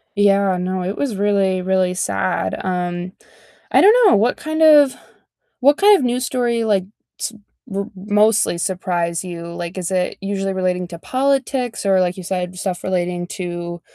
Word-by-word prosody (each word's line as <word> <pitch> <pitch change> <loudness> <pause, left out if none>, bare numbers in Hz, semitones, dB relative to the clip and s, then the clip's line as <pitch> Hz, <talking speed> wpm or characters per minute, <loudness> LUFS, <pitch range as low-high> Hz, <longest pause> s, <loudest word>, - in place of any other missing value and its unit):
Yeah, 200 -2 +3
no, 185 +1 -2
it 190 +3 -4
was 270 -7 -2
really, 195 -2 +1
really 185 0 +1
sad. 95 - -1
Um, 180 0 -3 0.6
I - - +5
don't 420 +4 +7
know, - - +5
what 225 +5 +2
kind 315 +1 -3
of 295 -4 +6 0.7
what 285 +3 +5
kind 410 +2 +6
of 280 - -3
news 245 +1 0
story, 240 -2 0
like, 200 -4 +1 0.3
s - - -3 0.3
w 200 -3 -4
mostly 210 0 +2
surprise 175 -2 -2
you? 170 -2 -7
Like, 175 +1 -6
is 180 -1 -3
it 185 -1 -1
usually 195 0 -2
relating 180 -1 -1
to 170 -2 -9
politics 260 -1 -1
or 195 -1 +3
like 180 0 0
you 185 - -7
said, 180 0 -4
stuff 180 -1 -4
relating 175 -1 -2
to, 175 -1 -5
190 Hz, 170 wpm, -19 LUFS, 180-225 Hz, 0.7 s, don't